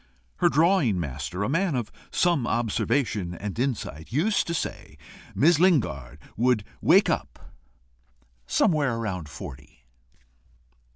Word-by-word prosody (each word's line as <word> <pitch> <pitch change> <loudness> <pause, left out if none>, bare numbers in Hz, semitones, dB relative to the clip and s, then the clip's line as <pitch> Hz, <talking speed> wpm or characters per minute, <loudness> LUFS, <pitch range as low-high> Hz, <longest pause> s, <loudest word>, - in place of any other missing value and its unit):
Her - - +3
drawing 155 - +3
master, 75 +5 -4
a - - 0
man 165 +3 0
of 120 -4 -3 0.2
some 170 -9 +1
observation 110 -4 -1
and 105 +4 -6
insight, 110 - -3
used 180 - +1
to 170 - -2
say - - -5 0.4
Miss 160 +2 +4
Lingard 75 - +1 0.2
would 120 -2 +2 0.2
wake - - +5
up - - -4 0.9
somewhere 145 - +2
about 90 -7 -4
forty. 65 -1 -11
120 Hz, 115 wpm, -26 LUFS, -, 0.9 s, wake